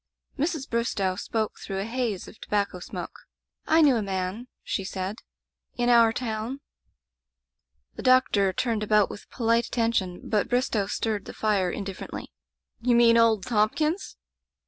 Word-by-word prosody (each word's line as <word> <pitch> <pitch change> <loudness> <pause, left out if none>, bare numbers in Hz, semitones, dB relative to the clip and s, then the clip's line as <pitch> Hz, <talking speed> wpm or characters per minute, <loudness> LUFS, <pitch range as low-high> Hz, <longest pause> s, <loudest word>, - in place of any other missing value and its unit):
Mrs. 305 -1 -2
Bristow 210 -5 0
spoke 215 +2 -3
through 195 - -6
the 195 +1 -2
haze 230 -4 -2
of - - -13
tobacco 200 -3 -1
smoke: - - -8 0.4
"I 320 +1 +5
knew 275 -5 +5
a - - 0
man," 195 +4 -3 0.2
she 195 - -2
said, 190 +2 -4 0.6
"in 240 0 +1
our 230 -2 +6
town 230 +3 -4 0.7
'' 65 0 -53
The - - -5
doctor 255 -7 +4
turned 225 +2 -1
about 210 -1 +3
with - - -11
polite 230 -1 +1
at - - -16
tention, 225 -7 0
but 210 -2 +1
Bristow 245 -5 +1
stirred 210 -1 -2
the - - -8
fire 200 -4 +1
indiffer 195 -2 -5
ently. - - -6 0.5
"You 240 0 +2
mean 235 -1 +6
old 225 -4 +4
Thompkins?" 300 - 0
220 Hz, 155 wpm, -26 LUFS, 195-240 Hz, 0.7 s, our